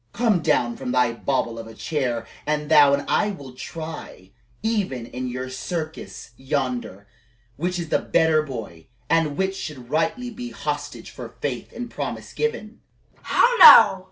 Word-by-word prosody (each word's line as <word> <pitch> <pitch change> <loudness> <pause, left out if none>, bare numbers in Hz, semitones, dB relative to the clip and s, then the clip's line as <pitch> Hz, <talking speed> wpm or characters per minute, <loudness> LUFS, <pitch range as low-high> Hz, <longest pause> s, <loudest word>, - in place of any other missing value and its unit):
Come 225 -6 +2
down 120 -5 +1
from 125 - -4
thy 125 -2 +2
bauble 120 -2 -2
of 115 - -8
a 115 - -12
chair 125 -7 -2 0.2
and 150 0 -1
thou 145 -2 +7
and 140 - -6
I 210 - +2
will 140 -10 -8
try, 155 - -8 0.3
even 200 - -1
in 125 +2 -5
your 125 +1 -4
circus 155 0 -6
yonder, 125 -7 -3 0.5
which 175 +6 -2
is 170 -2 -5
the - - +2
better 160 -1 +2
boy, 115 - -8 0.2
and 160 -3 +2
which 190 0 0
should 135 -9 -8
rightly 240 +11 -1
be 245 +1 -7
hostage - - -5
for - - -10
faith - - -4
and 245 0 -6
promise - - -6
given 455 +1 -3 0.4
"How - - +3
now!" 200 -4 +10
150 Hz, 155 wpm, -23 LUFS, 125-180 Hz, 0.5 s, now